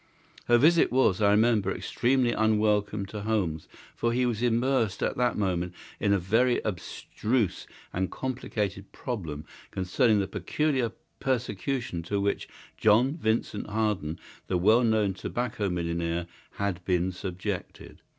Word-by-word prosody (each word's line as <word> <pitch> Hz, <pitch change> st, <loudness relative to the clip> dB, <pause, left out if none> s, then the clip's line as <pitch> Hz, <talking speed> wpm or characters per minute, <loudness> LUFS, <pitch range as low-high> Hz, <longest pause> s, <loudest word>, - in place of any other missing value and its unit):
Her 120 Hz, -, +5 dB
visit 160 Hz, +6 st, +5 dB
was, 120 Hz, -7 st, +3 dB
I 100 Hz, -, +5 dB
remember, 105 Hz, -2 st, +3 dB
extremely 125 Hz, +3 st, +1 dB
unwelcome 105 Hz, -2 st, +1 dB
to 105 Hz, +2 st, -7 dB
Holmes, 100 Hz, -8 st, -1 dB, 0.3 s
for 115 Hz, -, 0 dB
he 125 Hz, +1 st, +2 dB
was 120 Hz, -2 st, -1 dB
immersed 120 Hz, -3 st, +1 dB
at -, -, 0 dB
the 125 Hz, -1 st, +1 dB
moment 90 Hz, -3 st, -1 dB, 0.2 s
in 100 Hz, -, +1 dB
a 100 Hz, -, +5 dB
very 115 Hz, +7 st, +2 dB
abstruse 105 Hz, +3 st, -2 dB, 0.3 s
and 95 Hz, +1 st, -1 dB
complicated 105 Hz, -7 st, -3 dB
problem 80 Hz, -, -5 dB, 0.2 s
concerning 105 Hz, +4 st, +2 dB
the 95 Hz, -, 0 dB
peculiar 130 Hz, +3 st, 0 dB, 0.3 s
persecution 120 Hz, -5 st, -2 dB
to 100 Hz, +5 st, -2 dB
which 100 Hz, 0 st, -1 dB, 0.3 s
John 120 Hz, +7 st, +4 dB
Vincent 110 Hz, -7 st, -1 dB
Harden, 105 Hz, -7 st, -1 dB, 0.3 s
the 90 Hz, -, +1 dB
well 110 Hz, +7 st, +5 dB
known 110 Hz, -4 st, +2 dB
tobacco 110 Hz, +1 st, -2 dB
millionaire, 85 Hz, -1 st, -1 dB, 0.3 s
had 100 Hz, -3 st, -2 dB
been 90 Hz, 0 st, +1 dB
subjected. 90 Hz, -1 st, -6 dB
105 Hz, 130 wpm, -28 LUFS, 95-120 Hz, 0.3 s, Her